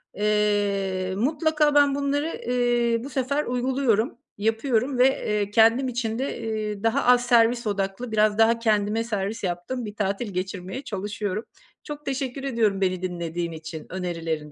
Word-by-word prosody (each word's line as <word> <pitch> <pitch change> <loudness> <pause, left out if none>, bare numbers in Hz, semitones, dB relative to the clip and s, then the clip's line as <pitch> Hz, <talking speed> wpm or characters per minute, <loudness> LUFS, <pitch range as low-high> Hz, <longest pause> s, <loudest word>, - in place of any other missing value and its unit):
Eee, 205 -2 0
mutlaka 300 +4 +2
ben 285 -1 +5
bunları, 285 +3 -1
ııı, 240 -2 +1
bu 275 - -6
sefer 280 +2 0
uyguluyorum, 250 -3 0 0.2
yapıyorum 225 +4 0
ve, 255 - +7
eee, 210 -6 -1
kendim 230 +5 +4
için 235 -2 -2
de, 270 -1 -3
eee, 215 -2 -3
daha 225 0 +2
az 245 0 +5
servis 235 -1 +3
odaklı, 200 +3 -2
biraz 215 -1 +3
daha 225 +1 +4
kendime 215 -1 +1
servis 210 -1 -3
yaptığım 185 +8 -3
bir 210 -1 -7
tatil 200 +1 -2
geçirmeye 190 +6 -4
çalışıyorum. 205 -1 -3 0.4
Çok 295 0 -8
teşekkür 270 0 -3
ediyorum 225 -7 +1
beni 185 -1 0
dinlediğin 170 -2 -3
için, 160 0 -8
önerilerin 165 -4 -4
220 Hz, 145 wpm, -25 LUFS, 195-250 Hz, 0.4 s, ve